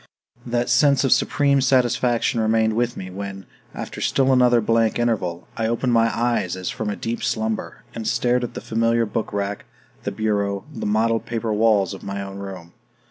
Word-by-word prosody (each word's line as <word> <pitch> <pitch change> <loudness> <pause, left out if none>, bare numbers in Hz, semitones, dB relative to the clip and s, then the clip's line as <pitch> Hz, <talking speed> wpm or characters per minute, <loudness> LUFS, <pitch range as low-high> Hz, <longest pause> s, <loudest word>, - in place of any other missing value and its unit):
That 120 0 0
sense 140 -2 +4
of 135 - +1
supreme 140 -1 +3
satisfaction 120 -2 +2
remained 110 0 +2
with 120 +2 -1
me 95 -1 -6
when, 95 0 -6 0.3
after - - -6
still 135 -1 +2
another 125 -2 +5
blank 115 0 +2
interval, 105 -8 -1
I 110 -1 -1
opened 120 +2 0
my 115 0 +4
eyes 120 -3 0
as 95 -1 -4
from 110 - -3
a 105 - -2
deep 115 +1 -4
slumber, 110 0 -2
and 115 -2 -5
stared 125 0 +1
at 120 - -5
the - - -5
familiar 115 +1 +1
book 110 +1 -3
rack, 100 0 -3 0.4
the - - -3
bureau, 100 -2 -1
the - - -4
mottled 115 +2 +1
paper 115 -1 -2
walls 105 -3 +3
of 95 - -9
my 100 0 -5
own 100 0 -8
room. 95 -4 -8
115 Hz, 185 wpm, -22 LUFS, 100-120 Hz, 0.4 s, another